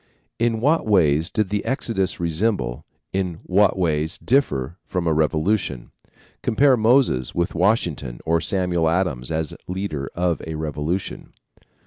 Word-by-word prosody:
In 115 -1 +1
what 150 0 +2
ways 80 -6 +3
did 105 -3 -1
the 105 0 -1
Exodus 115 -6 -1
resemble, 85 - -1 0.3
in 95 -3 -1
what 100 +1 +3
ways 80 -3 0
differ 85 - 0
from 90 -2 -3
a 80 - +2
revolution? 80 - 0 0.5
Compare 135 +4 +4
Moses 115 - +2
with 85 0 0
Washington 85 - 0
or 80 0 +2
Samuel 90 -3 +1
Adams 80 -8 -1
as 80 -2 -2
leader 90 -7 -3
of 85 -1 0
a 80 - -4
revolution. 75 +4 -4
90 Hz, 130 wpm, -22 LUFS, 80-105 Hz, 0.5 s, Compare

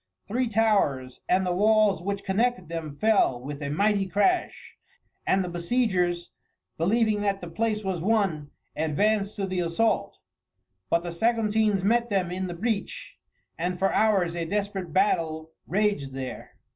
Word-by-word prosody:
Three 245 +4 0
towers 200 - +1
and 185 +1 +3
the 180 - 0
walls 210 -1 +3
which 200 +2 -3
connected 200 -2 0
them 160 -3 -5
fell 215 - +3
with 140 +3 -7
a 140 - -3
mighty 200 +5 +1
crash, 345 - 0 0.5
and 190 0 +3
the - - -4
besiegers, 175 -1 0 0.4
believing 215 +4 +1
that 200 -1 0
the 175 - -7
place 215 +5 -1
was 190 -4 -2
won, 190 -8 0 0.3
advanced 200 +7 0
to 200 - -2
the 185 -1 -2
assault. 175 +6 0 0.7
But 170 - +2
the 175 - -4
Saguntines 215 0 +1
met 235 +3 +2
them 190 -4 0
in 185 +1 -3
the 175 - -5
breach, 215 +2 -3 0.4
and 180 +2 -1
for 195 +1 +1
hours 195 -6 +2
a 170 - -2
desperate 195 -1 -3
battle 160 -4 0 0.2
raged 195 -8 0
there. 130 -1 -7
195 Hz, 150 wpm, -26 LUFS, 170-215 Hz, 0.7 s, and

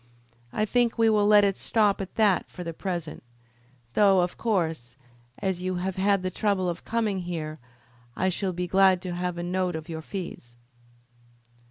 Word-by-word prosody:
I 215 - 0
think 240 +2 +1
we 225 -1 +4
will 210 -1 +3
let 210 -1 +7
it 200 -1 +2
stop 210 -2 +1
at 190 - -7
that 205 -5 +2
for 180 - -8
the 165 -1 -5
present; 170 -3 -4 0.7
though, 195 -3 +5
of 175 0 -1
course, 165 - -1 0.4
as 190 -2 -2
you 185 0 -2
have 185 +1 -2
had 195 0 +2
the 185 - -2
trouble 195 -1 0
of 175 -1 -4
coming 220 -4 -1
here, 160 -3 -5 0.6
I 185 - +1
should 185 0 -2
be 180 +1 -2
glad 190 0 +4
to 180 -2 -4
have 180 0 -3
a 175 - -3
note 180 0 -1
of 160 +1 -7
your 160 -1 -5
fees." 160 -9 -7
185 Hz, 180 wpm, -26 LUFS, 175-200 Hz, 0.7 s, let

